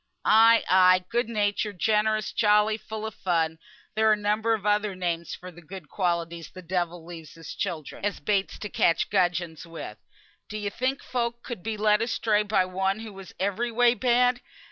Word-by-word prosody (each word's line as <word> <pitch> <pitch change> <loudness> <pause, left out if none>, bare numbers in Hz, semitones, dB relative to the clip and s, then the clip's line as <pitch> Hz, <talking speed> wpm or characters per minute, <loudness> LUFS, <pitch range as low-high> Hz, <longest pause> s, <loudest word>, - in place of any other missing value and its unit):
"Ay, 225 +1 +6
ay! 185 0 +5
good 235 0 0
natured, 205 -2 -1
generous, 215 +2 +1
jolly, 210 0 +3
full 220 0 -7
of 220 - -5
fun; 165 -4 -1 0.3
there 220 0 +3
are - - +6
a - - 0
number 210 +2 +1
of 210 -2 -9
other 210 -1 +1
names 170 -2 -3
for 185 0 -10
the 175 0 -14
good 175 -2 -10
qualities 170 -3 -2
the 185 - -12
devil 175 -1 -3
leaves 165 -3 -10
his 165 -2 -9
childer, 170 -7 -4
as 205 0 -1
baits 200 -2 -1
to 210 - -5
catch 170 -3 +1
gudgeons 175 -4 0
with. 165 0 -8 0.5
D'ye 210 -1 -4
think 260 +5 -2
folk 235 -1 -3
could 240 -7 -6
be 220 +3 -4
led 210 0 +3
astray 225 -2 +1
by 205 -3 +1
one 190 +3 -1
who 220 -2 -8
was 195 -1 -12
every 200 +5 -1
way 240 +1 +4
bad? 245 0 +2
205 Hz, 185 wpm, -26 LUFS, 180-220 Hz, 0.5 s, Ay